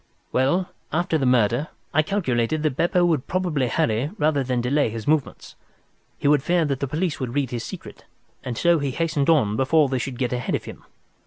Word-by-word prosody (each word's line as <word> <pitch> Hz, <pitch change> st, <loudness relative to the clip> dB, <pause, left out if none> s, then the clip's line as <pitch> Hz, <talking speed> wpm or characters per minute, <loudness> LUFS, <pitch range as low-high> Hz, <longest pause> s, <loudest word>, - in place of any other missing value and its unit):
Well, 175 Hz, +9 st, +1 dB, 0.2 s
after 170 Hz, 0 st, 0 dB
the 135 Hz, -, +1 dB
murder 125 Hz, +3 st, +2 dB, 0.3 s
I 155 Hz, -, +4 dB
calculated 155 Hz, -, -1 dB
that 150 Hz, -4 st, 0 dB
Beppo 175 Hz, +3 st, +2 dB
would 160 Hz, -7 st, 0 dB
probably 175 Hz, -8 st, 0 dB
hurry 115 Hz, +4 st, 0 dB
rather 150 Hz, -5 st, +1 dB
than 125 Hz, -1 st, -1 dB
delay 130 Hz, +2 st, +1 dB
his 110 Hz, 0 st, -7 dB
movements. 155 Hz, -1 st, -1 dB, 0.6 s
He -, -, -1 dB
would 145 Hz, -1 st, +4 dB
fear 170 Hz, +2 st, +1 dB
that 140 Hz, -3 st, -1 dB
the 140 Hz, -, -2 dB
police 155 Hz, +2 st, -2 dB
would 130 Hz, -2 st, -4 dB
read 140 Hz, -3 st, 0 dB
his 120 Hz, -2 st, -3 dB
secret, -, -, -9 dB, 0.4 s
and 120 Hz, -2 st, -4 dB
so 170 Hz, -1 st, +3 dB
he 140 Hz, -1 st, -1 dB
hastened 155 Hz, 0 st, 0 dB
on 130 Hz, -11 st, +3 dB
before 140 Hz, +2 st, +3 dB
they 130 Hz, -1 st, -1 dB
should 125 Hz, 0 st, -4 dB
get 125 Hz, -1 st, -1 dB
ahead 125 Hz, 0 st, -1 dB
of -, -, -4 dB
him. -, -, -10 dB
140 Hz, 200 wpm, -23 LUFS, 125-160 Hz, 0.6 s, I